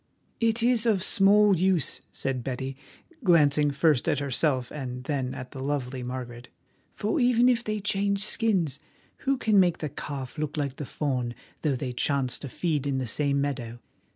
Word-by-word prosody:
"It 230 0 +2
is 240 -1 +4
of 200 -4 +3
small 205 +1 +5
use," 180 -4 0
said 130 -2 -3
Betty, 130 +1 -4 0.5
glancing 150 -5 +4
first 140 -1 +2
at - - +1
herself 135 -2 0
and 125 -3 -6
then 130 -2 -2
at 125 0 -8
the 135 - -7
lovely 135 -2 -2
Margaret, 125 -1 -6 0.5
"for 215 +8 -1
even 245 -1 +4
if 240 -2 +2
they 215 -1 -2
change 200 0 +1
skins, 185 - +1 0.5
who 275 - +3
can 215 -5 +3
make 175 -2 +3
the 155 - -4
calf 140 0 -6
look 155 0 -3
like 140 -3 -2
the 145 - -5
fawn, 125 -5 -2 0.3
though 150 -4 +1
they 125 0 -4
chance 130 0 0
to 140 - -7
feed 150 -2 -1
in 135 -1 0
the 130 - -1
same 140 +4 0
meadow? 120 -5 -3
145 Hz, 175 wpm, -27 LUFS, 130-195 Hz, 0.5 s, small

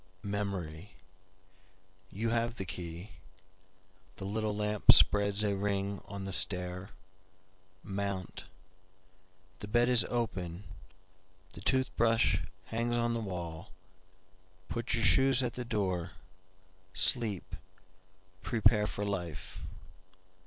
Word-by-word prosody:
Memory! 100 -4 -4 1.1
You 115 +4 -2
have 115 0 0
the 95 - -4
key, 85 +2 -7 1.0
The 95 - -7
little 105 +1 -1
lamp 105 0 +5
spreads 100 0 +5
a 100 -1 +1
ring 100 0 -1
on 100 -1 -7
the 95 - -3
stair, 90 +1 0 0.9
Mount.The 95 -1 -8
bed 120 +3 +3
is 125 -3 +5
open; 95 -7 -3 0.9
the - - -9
tooth 130 -1 +1
brush 115 -4 +3 0.2
hangs 120 +1 -1
on 120 0 +1
the 115 - -1
wall, 85 -4 -6 1.0
Put 115 0 -1
your 115 - 0
shoes 135 -1 +5
at 120 - -2
the 125 - -4
door, 95 -6 -2 0.8
sleep, 105 -2 +1 0.9
prepare 110 -2 +3
for 105 -1 -3
life." 90 -6 -4
100 Hz, 105 wpm, -32 LUFS, 95-115 Hz, 1.1 s, lamp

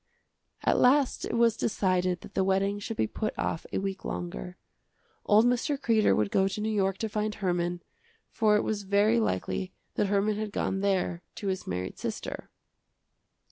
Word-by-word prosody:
At - - +3
last 270 +1 +3
it - - -3
was 230 -1 +4
decided 185 -5 0
that - - -12
the 190 - +2
wedding 195 +1 +1
should 225 +2 -5
be - - +2
put 215 - -4
off 160 - -2
a - - -1
week 195 0 -3
longer. 60 -9 -5 0.7
Old 215 +2 +6
Mr. 250 +4 +1
Kreder 225 -5 +3
would 105 -2 0
go 190 0 +3
to 195 +2 -4
New 215 +1 -1
York 195 -2 +1
to 220 - -2
find 215 0 -2
Herman, 175 -2 -1 0.5
for 215 -2 +3
it 210 - +2
was 215 -2 -1
very 205 +4 +3
likely 185 - -1 0.2
that 205 - +1
Herman 205 +1 +1
had 215 -1 -3
gone 195 - -1
there 190 -3 0
to 200 - -3
his 190 0 -3
married 90 +1 -4
sister. - - -5
200 Hz, 180 wpm, -28 LUFS, 185-215 Hz, 0.7 s, Old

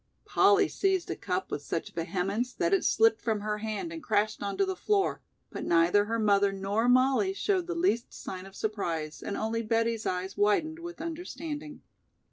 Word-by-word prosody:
Polly 405 +1 +4
seized 380 -3 0
a - - -2
cup 185 -1 -3
with 145 - -2
such 165 +3 -4
vehemence 195 +8 -2
that 345 - 0
it 390 - +3
slipped 225 0 +3
from 220 -3 -1
her 210 0 -2
hand 220 - -4
and 325 - -7
crashed 215 -4 0
onto 205 - 0
the 380 0 -2
floor, 400 0 0 0.3
but - - -5
neither 170 +5 +4
her 230 +2 -1
mother 200 -2 +3
nor 200 +5 0
Mollie 265 +10 +4
showed 385 -3 0
the 350 - -3
least 335 -9 +1
sign 185 0 -7
of 195 - -14
surprise 170 -9 -3
and 200 - -4
only 225 +1 -1
Betty's 230 0 0
eyes 185 +1 -2
widened 310 +11 +1
with 345 -1 -8
understanding. 320 -2 -6
225 Hz, 180 wpm, -29 LUFS, 200-330 Hz, 0.3 s, Polly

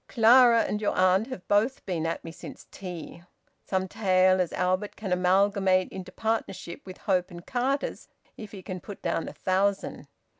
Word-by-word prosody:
"Clara 235 0 +6
and 210 - -2
your 210 - -1
aunt 185 +4 +3
have 255 -9 -8
both 215 +6 +1
been 165 -4 -2
at 165 - -3
me 165 - -7
since - - -11
tea. 175 -3 -8 0.4
Some 190 -1 -1
tale 185 -1 +3
as 175 - -2
Albert 185 +3 -1
can 195 -4 -3
amalgamate 185 +1 +2
into 185 -1 -8
partnership 220 -6 -3
with 185 - -9
Hope 185 -3 0
and 175 -1 -11
Carters 265 +3 -2 0.3
if 215 -2 -9
he 195 -3 -10
can 185 0 -6
put 205 +2 -10
down 170 -1 -1
a - - -7
thousand. 195 +1 -1
190 Hz, 175 wpm, -27 LUFS, 180-210 Hz, 0.4 s, Clara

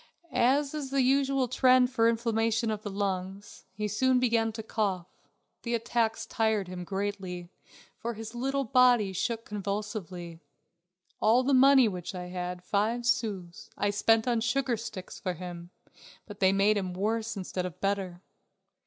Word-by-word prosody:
As 275 +4 +2
in 300 -3 -3
the 270 -1 +2
usual 270 0 +2
trend 255 0 +4
of 255 - -13
inflammation 225 0 +2
of 210 -1 -3
the 210 - -5
lungs, 195 0 -4
he 210 +3 -3
soon 255 +5 +2
began 230 -2 +2
to 220 0 -6
cough; 200 -5 -1 0.6
the 235 0 -1
attacks 230 -1 -1
tired 220 -3 0
him 180 0 -6
greatly, 190 -2 -4 0.5
for 235 0 -4
his 225 +1 -8
little 270 +3 -1
body 245 -5 +4
shook 230 +4 -2
convulsively. 200 -4 -5 0.8
All 235 +4 +4
the 275 +2 +1
money 265 -1 +7
which 185 -1 -5
I 180 0 -6
had, 180 0 -5
five 220 +5 0
sous, 205 -8 -2
I 205 0 +1
spent 225 +3 +2
on 235 -2 +1
sugar 250 +1 +1
sticks 220 -4 -8
for 185 - -2
him, 175 0 -8 0.6
but 205 -2 -11
they 190 -1 +4
made 200 +2 +3
him 185 -2 -3
worse 220 +3 -1
instead 185 -1 -3
of 170 - -11
better. 195 -2 -2
215 Hz, 155 wpm, -29 LUFS, 190-240 Hz, 0.8 s, money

